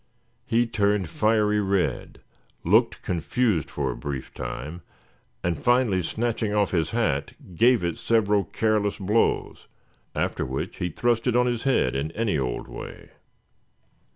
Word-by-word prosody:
He 120 +1 +3
turned 105 -5 +1
fiery 105 0 +2
red, 95 -9 -1 0.4
looked - - +3
confused 90 - 0
for 70 -3 -2
a - - -6
brief 70 -3 -6
time; 75 +7 -6 0.6
and 85 -1 -1
finally 120 -6 +3
snatching 110 +3 -1
off 105 -2 +2
his 80 -4 +1
hat, 105 -13 0 0.2
gave 120 +2 +4
it 85 -2 -2
several 105 -3 +2
careless 105 +2 0
blows, 105 +3 0 0.5
after - - -1
which 65 +1 -4
he 90 - -2
thrust 120 +6 0
it 125 - +2
on 125 0 +4
his 120 0 -1
head 135 - +2
in 70 +4 -2
any 105 -9 0
old 65 -2 -3
way. - - -9
105 Hz, 140 wpm, -25 LUFS, 80-115 Hz, 0.6 s, gave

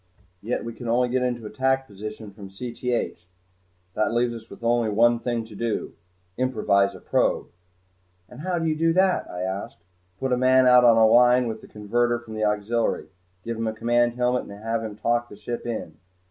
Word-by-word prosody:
Yet 115 +3 -3
we 115 - -5
can 120 +2 -8
only 125 +2 +2
get 130 +1 0
into 120 -3 -2
attack 130 +5 0
position 105 0 -8
from 100 -1 -11
Cth. 120 +3 -3 0.8
That 110 +3 0
leaves 120 0 +1
us 115 -1 -10
only 120 -1 +2
one 115 +3 +3
thing 120 -2 -2
to 110 - -13
do 115 +1 -3 0.4
improvise 100 -6 +1
a - - -10
probe." - - 0 0.8
"And 125 - -13
how 180 +3 -2
do 165 - -1
you 155 -1 +1
do 165 +1 +2
that?" 185 +1 +2
I 90 - -6
asked. 95 -2 -5 0.4
"Put 135 -1 0
a - - +2
man 130 +1 +4
out 125 0 +7
on 115 -2 +6
a 110 - +6
line 125 +2 +5
with 110 -1 -5
the - - -13
converter 120 +3 0
from 120 -2 -11
the 110 0 -2
auxiliary. 105 +3 -1 0.3
Give 115 0 -4
him 115 0 -2
a 110 - -1
command 120 +2 +1
helmet 125 +1 0
and 100 +1 -11
have 115 0 -1
him 110 -2 -6
talk 120 +3 0
the - - -11
ship 115 +4 -6
in." 95 -9 -5
120 Hz, 200 wpm, -24 LUFS, 110-125 Hz, 0.8 s, out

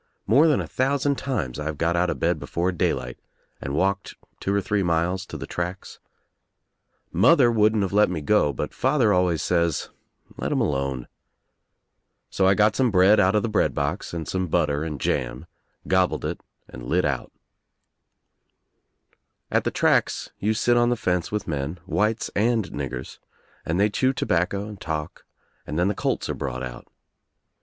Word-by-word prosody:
More 140 +10 +5
than 150 - +3
a - - -2
thousand 140 +1 0
times 75 - -3
I've 75 0 -4
got 85 +2 +1
out 90 +1 +2
of - - -3
bed - - +1
before 90 +2 -1
daylight 60 -7 -2 0.4
and 70 +1 -4
walked 100 +4 0 0.2
two 95 - -2
or 100 - +2
three 100 +1 0
miles 90 +2 0
to - - -7
the - - -6
tracks. 90 +2 -5 1.1
Mother 120 - +5
wouldn't 110 -1 +3
of 95 - -3
let 105 -1 +4
me 90 -3 -2
go 75 -1 +2
but 65 - -4
father 130 -6 +2
always 90 -3 +1
says, 85 -3 0 0.5
"Let - - -3
him - - +1
alone," 70 -3 -1 1.2
So 95 - +2
I 95 - +5
got 105 +1 +3
some 130 0 +2
bread 100 +1 +5
out 95 +3 +3
of 105 - +2
the - - 0
bread 110 - +1
box 70 0 -2
and 85 -2 -5
some 95 -1 -1
butter 75 -2 +1
and 75 -3 -4
jam, - - -2 0.4
gobbled 95 -1 +1
it - - -4 0.3
and - - -10
lit 90 +5 +1
out 70 -4 -2 2.2
At - - +1
the - - +2
tracks - - +1
you 110 +2 0
sit 120 +2 +2
on 120 0 +3
the 120 - +2
fence 90 -4 -1
with 105 -1 -3
men, 75 +2 -3
whites 105 +4 0
and 110 0 +2
niggers, 65 -3 -6 0.5
and 85 +3 0
they 105 +1 +3
chew 130 +5 +1
tobacco 100 -1 0
and 105 -3 -10
talk, 75 -2 -5 0.4
and 75 - -4
then 90 +3 +2
the - - 0
colts - - -2
are - - -2
brought 65 -1 -4
out. 60 -1 -8
95 Hz, 175 wpm, -24 LUFS, 80-105 Hz, 2.2 s, More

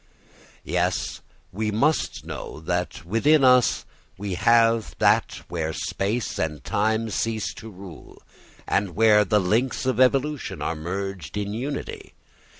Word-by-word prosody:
Yes, 90 +2 -1 0.3
we 105 +3 -2
must 140 +9 0
know - - -7
that 90 +1 -3
within 135 - +3
us 125 -1 +4 0.3
we 100 0 -4
have 115 +3 +3
that - - +2
where 80 -2 -3
space 105 +9 -2
and 75 -4 -2
time 110 +2 0
cease 110 0 -2
to 110 - -10
rule 95 -5 -12 0.5
and 100 -3 0
where 105 0 +5
the 105 +1 +2
links 115 +9 0
of 130 -1 0
evolution 135 +3 +1
are 80 - -2
merged 90 -1 -5
in 100 0 -2
unity. 135 +6 -5
105 Hz, 130 wpm, -24 LUFS, 90-115 Hz, 0.5 s, where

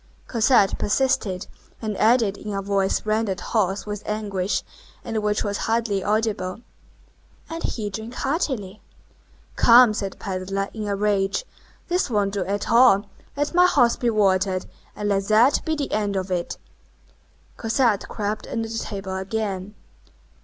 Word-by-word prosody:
Cosette 230 -4 +3
persisted, 205 -5 0 0.3
and 215 -2 -3
added 220 -3 +3
in 210 0 -6
a 195 - -1
voice 195 0 0
rendered 215 -3 0
hoarse 200 -3 -1
with 210 -1 -5
anguish, 205 -3 -1 0.4
and 220 -1 -2
which 210 0 0
was 205 -1 -2
hardly 225 -4 0
audible:— 215 -2 -1 0.9
"And 330 0 -4
he 210 -9 -3
drank 220 +4 -7
heartily." 260 - -2 0.7
"Come," 240 -1 +7
said 195 -2 -3
the - - -23
pedler, 195 +1 -3
in 215 -2 -4
a 200 - 0
rage, 200 - 0 0.4
"this 360 -4 0
won't 205 -3 0
do 200 -2 -1
at 200 +2 -2
all, 225 -4 +5 0.3
let 290 +3 -1
my 360 +1 +6
horse 245 -9 +4
be 240 - 0
watered, 190 -3 +2 0.3
and 210 - -3
let 195 -1 0
that 225 +6 +4
be 315 - 0
the 290 -2 -3
end 205 -1 0
of 190 0 -2
it!" 175 -1 -2 1.0
Cosette 225 -2 +1
crept 210 0 -3
under 225 -1 -3
the 225 0 -3
table 195 -2 -5
again. 195 0 -3
210 Hz, 150 wpm, -23 LUFS, 195-230 Hz, 1.0 s, Come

